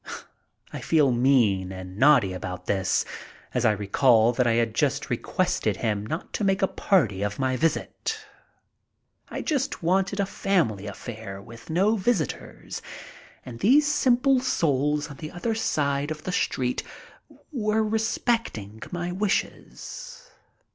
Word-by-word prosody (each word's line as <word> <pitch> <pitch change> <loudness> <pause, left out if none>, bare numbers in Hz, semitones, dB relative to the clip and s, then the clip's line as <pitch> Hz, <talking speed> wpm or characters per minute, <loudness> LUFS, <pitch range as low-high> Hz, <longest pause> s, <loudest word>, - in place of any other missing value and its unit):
I - - -5
feel 150 -5 +3
mean 120 -7 +3
and 95 0 -8
naughty 125 -5 +5
about 90 0 -6
this, 95 -1 +1 0.5
as 125 -1 0
I 110 - +6
recall 110 +3 +3
that 125 0 +1
I 115 - +3
had 115 -1 +1 0.4
requested - - 0
him 105 -2 -1
not 160 - -5
to - - -2
make 195 0 +2
a - - +5
party 125 - +1
of 100 0 -2
my 130 -1 0
visit. 165 - -1 1.1
I - - -5
just 280 - -1
wanted 195 +3 +1
a 200 - +2
family 160 - 0
affair, 105 -1 -7
with 115 +7 -13
no 195 +7 +2
visitors, 190 - -2 0.6
and 120 -2 -8
these 280 - +5
simple 270 -2 +3
souls 150 - +1
on 140 - -10
the 155 +2 -6
other 190 +7 -2
side 145 -9 0
of 155 -1 -5
the 185 - -3
street 125 -7 0 0.7
were 220 -5 +1
respecting 220 - -1
my 175 0 -3
wishes. - - -4
150 Hz, 135 wpm, -25 LUFS, -, 1.1 s, I